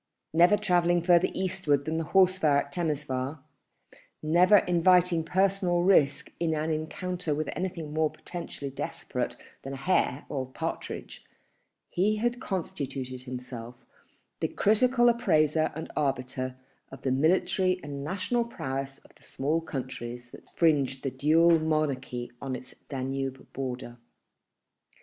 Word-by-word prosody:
Never 175 +5 +6
travelling 175 -4 +2
further 175 -1 +5
eastward 145 -6 0
than 160 +1 -1
the 165 - -2
horse 185 +2 +4
fair 150 -5 +4
at 140 0 -1
Temesvar, 150 -4 -2 0.9
never 175 +6 +6
inviting 180 -1 +3
personal 185 0 +2
risk 165 -7 +3
in 165 -2 +1
an 155 +1 -1
encounter 160 +1 -2
with 155 0 -2
anything 170 -4 -4
more 155 0 +2
potentially 160 -6 -7
desperate 135 - -4 0.3
than 135 - -6
a - - -5
hare 140 -3 +1
or 130 -3 -3
partridge, 130 - -5 0.6
he 205 +4 +1
had 240 +3 -1
constituted 135 - -4
himself 125 -2 -7 0.6
the - - +1
critical 240 +4 +3
appraiser 155 -10 +3
and 160 - -6
arbiter 130 -2 -2 0.4
of 135 - -11
the 130 - +1
military 180 +6 +2
and 140 -1 -6
national 195 +9 0
prowess 135 - -4
of - - -20
the - - -26
small 155 +5 -1
countries 125 -4 -6
that - - -14
fringed 140 -5 +2
the 135 - -1
Dual 160 +5 +4
Monarchy 140 -6 -1
on 135 -2 -3
its 130 +1 -8 0.2
Danube 135 0 -4
border. 125 -2 -5
155 Hz, 130 wpm, -28 LUFS, 135-180 Hz, 0.9 s, Never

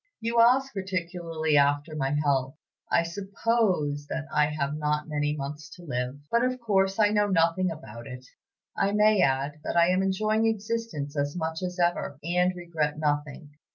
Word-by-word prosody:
"You 230 +1 0
ask 260 +4 +4
particularly 170 -5 -2
after 145 +2 +2
my 135 -3 -1
health. 135 -2 0 0.4
I 170 - +4
suppose 190 -5 -1
that 155 0 -4
I 150 -1 +4
have 150 -1 -2
not 150 0 -1
many 150 -1 -1
months 145 +2 -6
to 175 - -14
live; 125 -3 -3
but, 235 +1 +3
of 255 0 0
course, 195 -4 +1
I 210 -2 +4
know 210 0 +2
nothing 180 0 +2
about 120 -7 -9
it. 125 -1 -9 0.5
I 200 - +1
may 210 -1 +4
add, 140 +2 +1
that - - -2
I 170 +1 +5
am 185 +1 +2
enjoying 215 +3 +1
existence 215 -9 -3
as 145 +1 -1
much 160 -1 -3
as 180 0 -4
ever, 175 -5 0
and 180 +2 +1
regret 165 -4 -2
nothing. 145 0 -2
165 Hz, 170 wpm, -27 LUFS, 145-195 Hz, 0.5 s, I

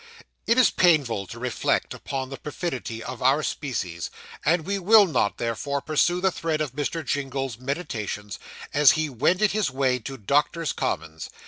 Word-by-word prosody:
It 230 - +3
is 255 - +6
painful 140 - +2
to 120 - -9
reflect 125 0 -1
upon 135 -1 -5
the 135 - -5
perfidy 130 - -5
of 130 - -7
our 135 +4 +3
species; 90 - -3 0.3
and 165 -1 +2
we 200 +1 -1
will 205 +3 +7
not, 155 - 0
therefore, 120 +5 -2
pursue 160 +5 +1
the 190 +1 +2
thread 165 -2 -2
of 150 -5 -2
Mr. 150 +2 -3
Jingle's 135 -2 -2
meditations, 115 - -4 0.3
as 145 -1 +6
he 155 -2 -1
wended 180 - +2
his 210 -4 +1
way 130 -1 +1
to 135 +4 -7
Doctors' 145 - +1
Commons. 80 0 -3
140 Hz, 160 wpm, -25 LUFS, 120-165 Hz, 0.3 s, will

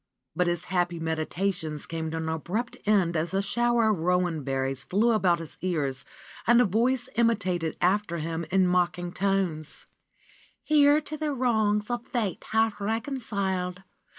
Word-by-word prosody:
But 180 +1 +1
his 175 0 -1
happy 175 -1 -1
meditations 160 0 -2
came 160 -1 -4
to 165 - -4
an 160 0 -3
abrupt 175 +10 -3
end 190 -5 +3
as 170 +4 -1
a 195 - +2
shower 235 +1 +2
of 200 - -1
rowan 175 -2 +1
berries 135 0 -2
fiew 220 +5 +2
about 185 -5 +3
his 165 -2 -9
ears 145 -8 -2 0.4
and 240 +1 +6
a 245 - +5
voice 235 +6 +1
imitated 185 -8 +1
after 190 -1 +1
him 165 +1 -3
in 190 0 +3
mocking 175 -1 +1
tones: 185 -5 -1 0.8
"Here 295 0 +5
to 305 +1 -6
the 300 -1 -1
wrongs 220 -3 +1
of 240 -1 -2
fate 220 -7 -2
half 220 -1 +1
reconciled. 200 -5 -2
185 Hz, 150 wpm, -27 LUFS, 165-220 Hz, 0.8 s, and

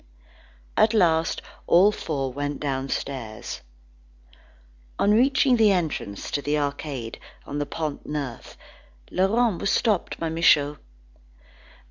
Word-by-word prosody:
At 220 +1 +4
last 165 -5 +2 0.2
all 190 +5 +6
four 135 -9 -3
went 145 +1 -3
downstairs. 135 -4 -4 1.4
On 205 - +3
reaching 260 +2 +4
the 220 -2 +5
entrance 160 - -2
to 145 - -1
the 145 +1 0
Arcade 140 -5 -4 0.3
of 145 - -4
the 145 - -2
Pont 155 -3 -4
Neuf, 140 -5 -5 0.5
Laurent 205 +1 +2
was 200 - 0
stopped 210 -6 +1
by 165 - -1
Michaud. 150 -3 +3
150 Hz, 110 wpm, -25 LUFS, 140-195 Hz, 1.4 s, all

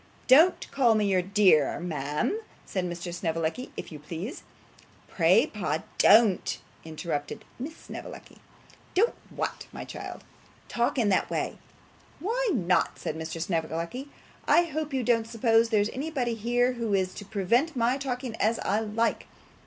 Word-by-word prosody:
'Don't 320 +8 +6
call 245 -5 +4
me 210 -1 +2
your 190 -2 +3
dear, 185 -6 +3
ma'am,' 150 - -2 0.3
said 185 - -2
Mr. 175 0 -5
Snevellicci, 165 +7 -2
'if - - -6
you 155 - -8
please.' 170 - -6 0.7
'Pray, - - +4
pa, - - -3 0.2
don't,' 210 -3 +5 0.3
interposed 155 -2 -4
Miss 300 +6 -6
Snevellicci. - - -10 0.6
'Don't 445 +6 +3 0.2
what, - - -4
my - - -7
child?' - - -8 0.5
'Talk 235 +3 0
in 225 -5 +3
that 190 - +2
way.' - - -2 0.6
'Why 460 +8 0
not?' 185 - +1
said 155 - -4
Mr. 160 +1 -5
Snevellicci. 170 - -3 0.4
'I 345 - +6
hope 310 -2 -4
you 265 -2 -1
don't 230 -2 +2
suppose 230 0 +3
there's 210 -2 +2
anybody 265 -3 -2
here 240 +3 +1
who 230 -4 -1
is 185 -1 0
to - - -8
prevent 220 - +1
my 245 +2 +1
talking 250 -3 -3
as 225 +2 +2
I 205 +2 +2
like? 225 +1 -1
220 Hz, 145 wpm, -27 LUFS, 180-255 Hz, 0.7 s, Don't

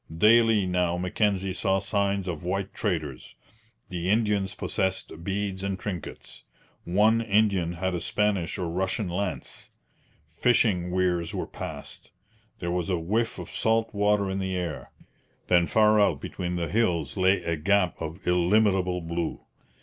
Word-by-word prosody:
Daily 110 +1 +5
now 90 -1 0
Mackenzie 95 +1 0
saw 95 +1 +1
signs 100 -1 0
of 85 -3 -4
white 95 +2 -2
traders. 75 -7 -3 0.5
The 90 0 -3
Indians 105 -2 +1
possessed 95 -5 -2
beads 95 0 -2
and 100 -1 -2
trinkets. 90 -5 -7 0.4
One 105 +6 +3
Indian 100 -5 +2
had 95 +2 -2
a 85 - -2
Spanish 105 -5 0
or 90 - -2
Russian 95 +4 -1
lance. 95 +2 -4 0.6
Fishing 90 +1 +2
weirs 90 -2 0
were - - -2
passed. - - -8 0.5
There 85 -1 -3
was 90 0 -1
a 90 - +1
whiff 110 +8 -1
of - - -8
salt 115 0 +1
water 105 0 +2
in 95 0 -2
the 95 -1 -2
air; 85 -4 -4 0.6
then 85 -1 +4
far 110 -1 +4
out 100 - +2
between 90 -1 -4
the 85 -1 -1
hills 85 - 0
lay 95 -1 +3
a 85 0 -1
gap 90 +3 +1
of 80 +4 -6
illimitable 90 0 +2
blue. 85 0 -3
95 Hz, 145 wpm, -26 LUFS, 90-105 Hz, 0.6 s, Daily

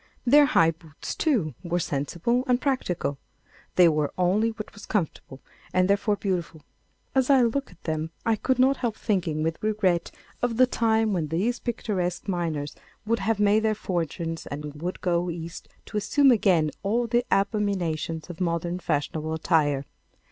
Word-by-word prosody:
Their 290 +3 +7
high 165 - +4
boots, 160 -2 -8
too, 220 - +1
were 175 -1 -1
sensible 175 - -1
and 250 -1 +3
practical. 180 - -1 0.6
They 180 -1 +7
wore 150 -2 +1
only 190 +5 +2
what 220 -1 -7
was 205 - -12
comfortable, 160 -8 -3 0.3
and 185 0 +4
therefore 200 +1 +2
beautiful. 175 -6 -3 0.5
As 265 -1 +2
I 270 -3 +6
looked 270 +4 0
at 180 - -20
them 155 0 -2 0.2
I 225 - +3
could 260 +4 0
not 260 +1 +4
help 235 -4 -2
thinking 170 -9 -1
with 160 0 -2
regret 200 -5 +1 0.3
of 245 -2 0
the 255 - +7
time 225 -3 +1
when 165 -5 -1
these 195 +11 0
picturesque 200 -7 -2
miners 165 -6 -2 0.3
would 230 +2 +1
have 225 -2 0
made 210 +1 +4
their 220 -1 +1
fortunes 165 -4 -3
and 150 +1 -7
would 180 +2 -4
go 175 0 +1
East 165 0 -7 0.2
to 210 - -5
assume 270 +7 +4
again 180 -9 +3
all 230 +5 +1
the 240 +1 +1
abominations 195 -6 0
of 175 0 -8
modern 170 0 -1
fashionable 155 0 -2
attire. 150 -4 +1
185 Hz, 160 wpm, -26 LUFS, 165-225 Hz, 0.6 s, Their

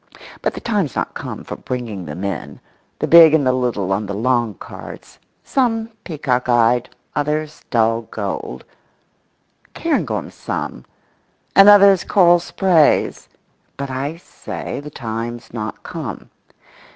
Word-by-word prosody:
—but - - -1
the - - -5
time's 205 - -1
not - - -2
come - - -6
for - - -6
bringing 115 -7 -5
them 85 +5 -6
in—the 100 - -6
big 165 -2 +8
and 145 -3 +2
the 130 - +4
little 115 -7 -1
on 100 +1 -2
the 100 - -4
long 120 -1 +1
cards, - - -11 0.2
some 225 -4 0
peacock 130 -7 -2
eyed, 120 0 +3 0.3
others 150 +1 -2
dull 115 0 +2
gold; 95 - -5 1.1
cairngorms - - -1
some, 65 - -5 0.7
and 195 +2 +9
others 200 -2 +7
coral 175 -3 +5
sprays—but 160 -5 0
I 140 +5 -3
say 170 - -7
the 145 +1 -8
time's 115 -2 -6
not 110 -2 -5
come. - - -7
130 Hz, 125 wpm, -19 LUFS, 115-165 Hz, 1.1 s, and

